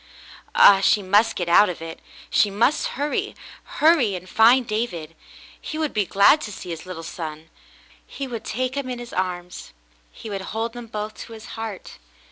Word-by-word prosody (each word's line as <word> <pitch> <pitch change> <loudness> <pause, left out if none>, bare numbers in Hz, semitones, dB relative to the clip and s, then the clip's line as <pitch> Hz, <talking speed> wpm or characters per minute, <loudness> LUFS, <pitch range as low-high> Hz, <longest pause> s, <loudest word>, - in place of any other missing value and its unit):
Ah, 195 -1 +8
she 205 +1 +3
must 210 +4 +3
get 175 - -3
out 180 +4 +6
of 180 - -5
it. 165 0 -8 0.3
She 210 - +4
must 230 +9 +1
hurry 290 +2 -2 0.2
— - - -21 0.2
hurry 295 - +4
and 180 0 -8
find 240 +5 +5
David. 180 -8 -3 0.5
He 310 - -6
would 310 -2 -2
be 210 -3 0
glad 200 +10 +5
to 210 - -6
see 180 -2 -8
his 165 +2 -7
little 170 -3 -7
son. 160 -1 -7 0.6
He 275 - -6
would 235 -4 -6
take 255 +3 -2
him 280 -2 -3
in 250 - -4
his 240 0 -9
arms. 180 -1 -4 0.4
He - - -11
would 195 -1 -3
hold 225 +4 -4
them 240 -1 -9
both 215 -1 -5
to 230 - -11
his 220 0 -11
heart. 225 - -7
210 Hz, 190 wpm, -23 LUFS, 180-240 Hz, 0.6 s, Ah